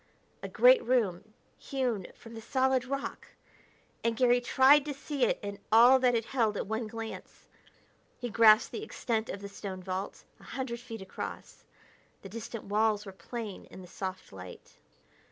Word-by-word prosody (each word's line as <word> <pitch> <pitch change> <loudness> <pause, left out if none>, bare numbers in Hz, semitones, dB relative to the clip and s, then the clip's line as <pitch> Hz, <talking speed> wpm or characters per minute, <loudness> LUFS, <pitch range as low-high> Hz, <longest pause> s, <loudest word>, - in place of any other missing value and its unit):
A - - -5
great - - +5
room, 215 -4 0 0.2
hewn 245 -8 -2
from 230 - -13
the 225 - -8
solid 260 +1 +1
rock! 275 +2 -5 0.8
and 230 -1 0
Garry 245 0 +4
tried 265 +4 +5
to 290 -2 -4
see 280 -1 -1
it - - 0
and 200 0 -5
all 240 +4 +7
that 250 -1 +3
it 225 -1 0
held 225 -5 +1
at - - -2
one 220 +2 -3
glance. 225 0 -8 0.7
He 245 - -4
grasped 220 -1 +5
the - - -5
extent 230 - -3
of 195 - -5
the 200 - -6
stone 195 -2 -7
vault, 185 +1 -5 0.2
a - - -18
hundred 245 -3 -3
feet 230 -4 -8
across; 190 - -8 0.6
the 195 - -8
distant 230 +1 -7
walls 210 +1 +1
were 195 - -7
plain 205 +3 -7
in 190 - -12
the - - -12
soft 185 - -6
light. 90 -1 -12
225 Hz, 170 wpm, -30 LUFS, 200-255 Hz, 0.8 s, all